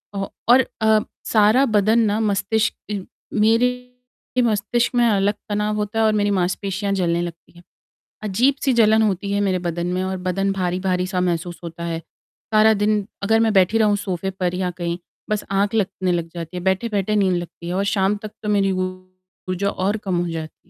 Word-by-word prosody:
औ 195 0 -2 0.2
और 255 +1 +7 0.2
अ, 220 0 +5 0.3
सारा 220 +5 +4
बदन 215 -1 +3
ना 215 -1 +2
मस्तिष्क 210 -1 -1 0.3
मेरे 250 +3 0
मस्तिष्क 230 +2 0
में 240 -1 +4
अलग 205 -1 +2 0.2
तनाव 210 +1 0
होता 210 +1 -2
है 220 - +4
और 215 - +3
मेरी 205 -1 +1
मांसपेशियाँ 195 +2 -1
जलने 175 -3 +1
लगती 170 -1 -7
हैं, 175 0 -17 0.6
अजीब-सी 260 +7 +2
जलन 220 -1 +5
होती 200 -1 0
है 205 - +1
मेरे 190 -2 +1
बदन 175 0 -3
में 185 - -1
और 190 0 -2
बदन 195 +2 -1
भारी-भारी-सा 185 0 -1
महसूस 175 -1 -2
होता 170 0 -7
है, 165 -1 -2 0.6
सारा 215 +1 +6
दिन 205 0 +1 0.2
अगर 225 +2 +3
मैं 225 -1 +3
बैठी 190 +3 +4
रहूँ 210 -2 +3
सोफ़े 190 -2 -3
पर 180 -2 -2
या 180 0 -1
कहीं 170 0 -2 0.3
बस 210 -1 -1
आँख 200 +2 +1
लगने 190 -3 0
लग 170 -1 -1
जाती 170 +1 -6
है। 180 - -4
बैठे-बैठे 205 +1 0
नींद 190 -3 +2
लगती 170 0 -7
है 175 - -2
और 195 +2 0
शाम 200 0 +1
तक 215 - -6
तो 210 - -4
मेरी 200 -2 +2 0.8
ऊर्जा 185 +2 -1
और 200 +3 -1
कम 180 -2 0
हो 175 - -3
जाती। 160 -1 -6
200 Hz, 185 wpm, -21 LUFS, 185-215 Hz, 0.8 s, और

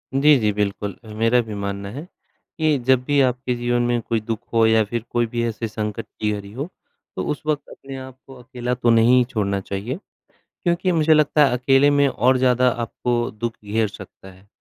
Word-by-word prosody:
जी, 145 +1 +6
जी 105 -2 +1
बिल्कुल। 100 0 -2
अ, 110 - -15
मेरा 115 +3 +3
भी 110 - -5
मानना 100 0 -4
है 145 +8 -7 0.5
कि 155 -2 +2
जब 130 -1 +4
भी 145 0 +2
आपके 125 -1 0
जीवन 120 0 0
में 120 -1 +1
कोई 115 0 -1
दुख 110 0 -4
हो 115 -1 +4
या 110 -1 +4
फिर 115 +2 -4
कोई 120 0 +1
भी 120 - 0
ऐसे 115 0 -3
संकट 105 -1 -4
की 105 -1 0
घड़ी 100 -1 -6
हो, 135 +8 -5 0.5
तो 95 - -2
उस 150 - -4
वक़्त 150 -1 -2
अपने 135 0 -10
आप 130 -1 -10
को 135 - -12
अकेला 125 0 -4
तो 120 -1 +1
नहीं 120 +2 +5
छोड़ना 100 -5 -1
चाहिए। 100 - -4 0.7
क्योंकि 175 +1 +1
मुझे 160 -1 +4
लगता 150 0 +4
है - - 0
अकेले 135 +3 +4
में 145 0 +4
और 130 +2 +2
ज़्यादा 125 0 +3
आपको 120 +1 -2
दुख 115 0 -4
घेर 110 +1 0
सकता 95 -1 -12
है। 95 +2 -20
120 Hz, 205 wpm, -22 LUFS, 110-130 Hz, 0.7 s, जी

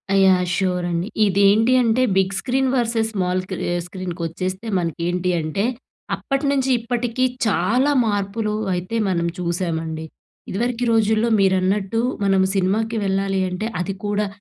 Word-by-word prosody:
Yeah! 190 -2 +5
Sure 180 -2 0
అండి. 170 +2 -1 0.2
ఇదేంటి 200 +5 +4
అంటే 230 +2 +2 0.2
big 190 0 +2
screen 265 +1 0
versus 230 -2 +1
small 185 -2 0
key 185 - -3 0.2
ఆహ్, 175 0 -1
స్క్రీనుకొచ్చేస్తే 185 +2 -4
మనకేంటి 175 +1 -1
అంటే, 155 +5 -2 0.5
అప్పటి 275 +1 -2
నుంచి 270 -1 +1
ఇప్పటికి 240 +1 -2 0.2
చాలా 220 - +2
మార్పులు 210 +1 -1 0.2
అయితే 180 +5 -3
మనం 170 -2 0
చూశామండి. 165 -2 -2 0.4
ఇదివరకి 240 +4 -1
రోజుల్లో 220 +1 +2
మీరన్నట్టు 190 +2 +1 0.2
మనం 195 -1 +3
సినిమాకి 215 +4 0
వెళ్ళాలి 195 0 0
అంటే, 180 +4 -4
అది 185 +2 -2
కూడా 205 0 0
195 Hz, 130 wpm, -21 LUFS, 180-225 Hz, 0.5 s, Yeah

